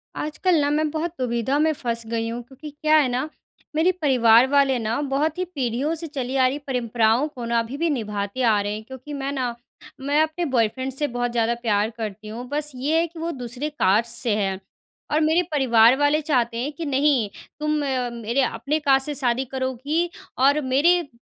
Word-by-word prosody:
आजकल 340 +4 0
ना 285 - +1
मैं 305 +1 +1
बहुत 320 +2 -2
दुविधा 245 +2 0
में 315 +1 +3
फंस 235 -4 -3
गई 230 0 -2
हूँ 235 +1 -4
क्योंकि 275 +5 -11
क्या 305 +1 +1
है 295 -3 +4
ना, 255 +5 -2 0.5
मेरे 325 +4 +4
परिवार 245 -3 +5
वाले 275 -2 +3
ना, 225 +2 -1
बहुत 290 +3 -1
ही 365 - -1
पीढ़ियों 280 -2 -2
से 330 +1 -5
चली 270 -3 -4
आ 260 -1 +4
रही 270 - -2
परंपराओं 235 0 +1
को 250 -6 -8
ना 235 0 +1
अभी 230 +4 -4
भी 335 +2 0
निभाते 210 -3 -3
आ 225 -4 +4
रहे 205 +1 -2
हैं 215 +1 -6
क्योंकि 260 +5 -10
मैं 275 -1 -3
ना, 255 -4 -2 0.5
मैं 285 +3 +2
अपने 315 +3 -2
बॉयफ्रेंड 260 -1 0
से 295 +3 -1
बहुत 245 -2 -2
ज़्यादा 235 0 +1
प्यार 210 -2 +1
करती 215 -1 -6
हूँ। 235 +4 -7
बस 295 +1 -2
ये 290 +6 +1
है 335 - +1
कि 330 0 -12
वो 335 +1 -2
दूसरे 255 +1 -5
कास्ट 225 -5 +2
से 230 -5 +1
है 195 -2 -1 0.5
और 305 +1 +2
मेरे 320 +3 +3
परिवार 240 -4 +5
वाले 290 +2 +2
चाहते 245 -6 0
हैं 260 +5 -2
कि, 325 +3 -6
"नहीं, 275 -5 +2 0.3
तुम 300 0 -1 0.5
मेरे 235 +5 0
अपने 270 +5 -1
कास्ट 270 -3 +3
से 295 - -3
शादी 260 -1 0
करोगी 265 +6 -2 0.3
और 280 +3 +4
मेरे 285 +7 +3
अ, 340 - -6
265 Hz, 205 wpm, -23 LUFS, 235-300 Hz, 0.5 s, परिवार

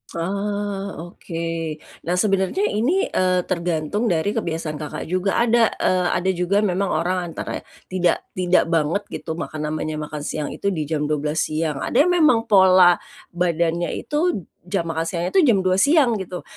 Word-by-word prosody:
Oh, 200 0 -3
oke. 170 - -9 0.7
Nah 175 - +1
sebenernya 195 - +1
ini, 330 - +1
eee, 185 -1 +2
tergantung 175 +4 -1
dari 175 +1 +1
kebiasaan 165 -7 -3
Kakak 150 -1 -5
juga, 185 +3 -1
ada, 235 -1 +4 0.2
eee, 180 -1 +2
ada 185 +1 0
juga 190 +3 +1
memang 195 0 0
orang 180 0 -1
antara - - -4 0.3
tidak, 180 -2 +1
tidak 180 -2 +1
banget 165 +5 +1
gitu 160 - -5
maka 160 -2 -5
namanya 155 0 -3
makan 150 -1 -6
siang 150 0 -3
itu 200 - -1
di 155 -5 -3
jam 150 -1 -1
12 150 +1 0
siang. 155 -2 -2
Ada 285 +7 +3
yang 355 -2 +3
memang 230 -7 +4
pola 185 -3 +6 0.4
badannya 170 -1 0
itu 295 - -1 0.2
jam 185 -1 -1
makan 165 0 -2
siangnya 170 +1 -2
itu 385 - +5
jam 220 -5 +4
2 185 0 +2
siang 285 0 +4
gitu. 180 -1 -6
180 Hz, 165 wpm, -22 LUFS, 165-200 Hz, 0.7 s, pola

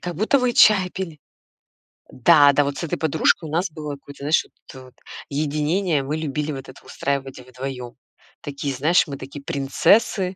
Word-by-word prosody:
как 175 -1 -5
будто 220 - +2
вы 250 -1 +1
чай 205 -5 +5
пили. 180 -5 -6 0.9
Да-да, 145 +1 +5
вот 140 0 -4
с - - -5
этой 165 - -3
подружкой 160 +1 +1
у - - -8
нас 175 +3 -1
было 150 -1 -6
какое-то, 140 0 -13
знаешь, 150 +2 +2
вот - - -24 0.2
это 130 -2 -11
вот, 130 - -18 0.4
единение, 150 +2 0
мы 150 +3 -3
любили 150 0 -3
вот 135 -2 -8
это 130 - -15
устраивать 135 -1 -4
вдвоём. 125 -1 -8 0.5
Такие, 140 -1 -4
знаешь, 155 +8 +2
мы 140 -2 -6
такие 140 +2 -10
принцессы. 180 +8 +1
145 Hz, 175 wpm, -22 LUFS, 140-170 Hz, 0.9 s, чай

